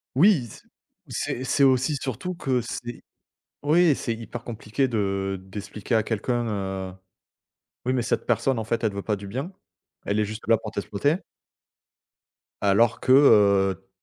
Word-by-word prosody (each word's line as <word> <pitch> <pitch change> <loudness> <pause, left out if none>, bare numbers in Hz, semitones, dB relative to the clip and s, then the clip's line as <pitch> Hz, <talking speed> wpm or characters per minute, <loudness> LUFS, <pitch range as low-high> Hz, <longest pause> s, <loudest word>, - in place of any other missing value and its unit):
Oui 165 - +5
c - - -14 0.5
c'est 125 - -3
c'est 140 +2 +2
aussi 135 +2 +3
surtout 135 +8 -4
que 130 -6 0
c'est 120 +1 -7 0.6
oui 160 +2 +4
c'est 115 -3 -3
hyper 115 +1 -8
compliqué 120 +3 -2
de 95 -3 -1
d'expliquer 105 +3 -5
à 110 - +4
quelqu'un, 105 -4 -2
heu: - - -11 0.9
«Oui 130 - +1
mais 130 - +1
cette - - -1
personne 120 +2 +1
en 110 - -2
fait 115 +2 -2
elle 110 - +2
veut 100 0 -5
pas 105 - 0
du 100 0 -9
bien, 135 - -4 0.6
elle 100 +1 +1
est 105 - +2
juste 110 +2 -8
là 115 0 +5
pour 110 0 -7
t'exploiter 110 - -1 1.4
alors 105 +3 +3
que, 130 - +1
heu, 100 -7 +5
115 Hz, 160 wpm, -25 LUFS, 100-130 Hz, 1.4 s, Oui